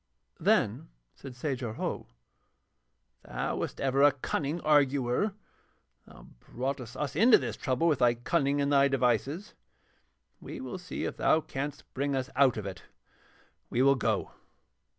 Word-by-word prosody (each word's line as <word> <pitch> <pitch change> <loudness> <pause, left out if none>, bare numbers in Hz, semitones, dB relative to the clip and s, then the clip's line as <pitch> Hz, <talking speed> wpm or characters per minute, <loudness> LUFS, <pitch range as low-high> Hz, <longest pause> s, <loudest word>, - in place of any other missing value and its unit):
Then - - +1 0.2
said 135 -3 -11
Sajar 125 -4 -3
Ho: - - -4 1.2
'Thou - - -3
wast - - -4
ever 135 0 +1
a 145 0 +7
cunning 145 +3 -3
arguer. 145 - +2 0.7
Thou - - -15
broughtest 125 - -5
us 145 -2 -3
into 225 +8 +7
this - - -4
trouble 140 +4 0
with 155 -5 +2
thy 120 -1 +4
cunning 140 +3 0
and 140 0 +1
thy 140 0 +5
devices, 135 - 0 0.9
we - - -8
will 200 -8 -6
see 180 0 -6
if - - -4
thou 155 - +3
canst 145 -2 -5
bring 140 +1 -1
us 130 0 -3
out 135 -3 +4
of 105 - -4
it. 95 -2 -6 0.9
We 125 - +1
will 140 0 +6
go.' 115 -6 -1
140 Hz, 145 wpm, -29 LUFS, 125-145 Hz, 1.2 s, a